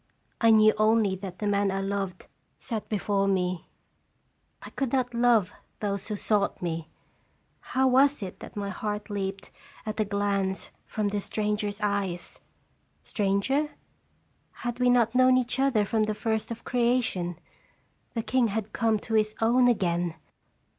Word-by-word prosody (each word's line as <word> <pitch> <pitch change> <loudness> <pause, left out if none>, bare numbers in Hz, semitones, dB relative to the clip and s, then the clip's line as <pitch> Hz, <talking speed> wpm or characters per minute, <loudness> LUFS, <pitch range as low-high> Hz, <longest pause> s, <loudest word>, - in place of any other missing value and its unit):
1 225 -1 +6
knew 215 0 +6
only 215 -2 +3
that 185 -1 -7
the 210 - -4
man 200 -1 +2
I 195 0 -1
loved 195 -2 -3 0.3
sat 220 -3 -5
before 200 -2 0
me. 185 -2 0 1.0
I - - -9
could 270 -3 -2
not 250 -2 0
love 235 -5 +3 0.3
those 200 -2 -2
who 215 - -2
sought 205 0 0
me. 165 -2 -3 0.7
How 265 0 +1
was 270 -1 +4
it 185 - -7
that - - -10
my 200 -1 -3
heart 210 +1 -4
leaped 195 -1 -4 0.3
at 215 0 -4
a - - +4
glance 200 -1 -1 0.2
from 210 -2 -1
this 200 -1 -3
stranger's 210 -1 -2
eyes? 200 -4 -2 0.6
Stranger? 215 +9 0 0.9
Had 240 0 -2
we 250 0 +4
not 240 -2 +3
known 255 0 +5
each 250 +1 -1
other 255 -6 +3
from 220 +2 0
the 215 0 -2
first 220 +1 -1
of 230 0 -6
creation? 235 -8 0 0.8
The 230 - -1
king 255 -1 +2
had 215 0 -3
come 225 -2 +2
to 225 - -6
his 215 -1 +2
own 245 +3 +4
again 175 -7 +1
210 Hz, 155 wpm, -27 LUFS, 195-235 Hz, 1.0 s, 1